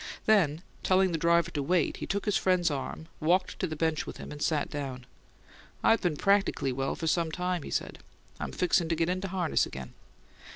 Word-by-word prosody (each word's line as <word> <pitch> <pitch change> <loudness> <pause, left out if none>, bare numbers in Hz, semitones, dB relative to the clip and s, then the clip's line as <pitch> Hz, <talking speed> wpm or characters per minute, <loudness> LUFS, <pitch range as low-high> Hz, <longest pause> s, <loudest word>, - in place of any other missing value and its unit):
Then, 175 -7 +3 0.2
telling 190 0 +3
the 165 - -1
driver 170 +1 +3
to 145 - -2
wait, 175 +3 +1
he - - -5
took 200 +1 -2
his 210 -2 +1
friend's 180 -3 +2
arm, 145 +3 -5
walked 175 +4 +1
to 185 - 0
the 155 - -4
bench 160 0 0
with - - -7
him, - - -8
and 145 0 -8
sat 155 -3 +1
down. 135 -3 -5 0.8
"I 225 - +6
been 175 -8 -1
practically 195 -8 +2
well 135 +2 -2
for 165 - -5
some 165 0 +1
time," 180 +1 -1
he - - -8
said. - - -3 0.4
"I'm - - -4
fixin' 175 -2 +1
to 165 - +2
get 165 +1 0
into 185 +2 -1
harness 180 -3 +1
again." 65 -1 -8
170 Hz, 205 wpm, -29 LUFS, 150-185 Hz, 0.8 s, I